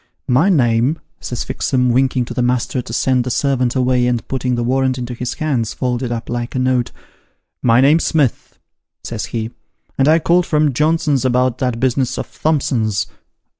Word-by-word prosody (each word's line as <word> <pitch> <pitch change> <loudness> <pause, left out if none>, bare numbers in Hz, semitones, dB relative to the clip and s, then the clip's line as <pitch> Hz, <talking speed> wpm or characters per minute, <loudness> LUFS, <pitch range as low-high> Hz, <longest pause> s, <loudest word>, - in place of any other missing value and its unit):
' - - -58
My 190 - +3
name,' 125 -2 +2 0.2
says 120 - -4
Fixem, 130 -1 0
winking 130 0 +1
to - - -7
the - - -1
master 125 +1 0
to 120 - -10
send 125 +1 +1
the 125 - -4
servant 130 -1 0
away, 125 -1 +2
and 120 -2 -1
putting 130 -1 -1
the 120 - -1
warrant 130 +1 +1
into 125 -1 -5
his 125 +1 -4
hands 130 -9 -1
folded 125 -1 -2
up 115 -1 -4
like 120 +1 -4
a - - 0
note, 125 -1 +1 0.4
' - - -50
My 120 +2 +5
name's 150 +5 +4
Smith,' 145 -7 0 0.5
says 115 -2 -4
he, 115 0 -4 0.2
' - - -43
and 135 - +4
I 160 +1 +6
called 175 +2 +2
from 150 -2 +2
Johnson's 150 -1 +1
about 125 -1 +1
that 125 -3 -1
business 130 0 0
of - - -5
Thompson's.' 125 -9 +1
125 Hz, 190 wpm, -18 LUFS, 120-135 Hz, 0.5 s, I